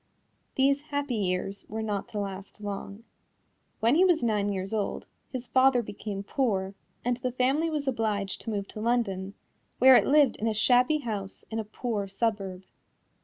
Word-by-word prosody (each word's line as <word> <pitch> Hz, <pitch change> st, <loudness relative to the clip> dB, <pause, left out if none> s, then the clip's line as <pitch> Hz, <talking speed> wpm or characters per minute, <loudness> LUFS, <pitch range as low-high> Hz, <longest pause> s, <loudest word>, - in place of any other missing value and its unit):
These 275 Hz, +1 st, +3 dB
happy 285 Hz, -3 st, -3 dB
years 195 Hz, -1 st, -1 dB
were 220 Hz, +1 st, -3 dB
not 205 Hz, -2 st, -2 dB
to 215 Hz, -, -7 dB
last 195 Hz, 0 st, -6 dB
long. 205 Hz, +1 st, -6 dB, 0.8 s
When 230 Hz, +3 st, +4 dB
he 340 Hz, +5 st, +5 dB
was 350 Hz, -6 st, +3 dB
nine 210 Hz, -3 st, +1 dB
years 195 Hz, +1 st, -3 dB
old, 210 Hz, -2 st, -2 dB, 0.2 s
his 255 Hz, -2 st, -5 dB
father 255 Hz, 0 st, +4 dB
became 205 Hz, -1 st, -6 dB
poor 200 Hz, -6 st, 0 dB, 0.3 s
and 245 Hz, 0 st, +1 dB
the 250 Hz, 0 st, -2 dB
family 270 Hz, +6 st, +1 dB
was 300 Hz, -3 st, -2 dB
obliged 215 Hz, -6 st, -1 dB
to -, -, -6 dB
move 200 Hz, -2 st, -2 dB
to 215 Hz, -, -7 dB
London, 200 Hz, -5 st, 0 dB, 0.4 s
where 260 Hz, +1 st, +8 dB
it -, -, +5 dB
lived 285 Hz, -3 st, +4 dB
in 225 Hz, -, -1 dB
a 220 Hz, -, 0 dB
shabby 250 Hz, +7 st, +4 dB
house 205 Hz, -6 st, -5 dB
in 225 Hz, -, -2 dB
a -, -, -1 dB
poor 215 Hz, -1 st, -3 dB
suburb. 195 Hz, -2 st, -2 dB
220 Hz, 170 wpm, -28 LUFS, 200-255 Hz, 0.8 s, where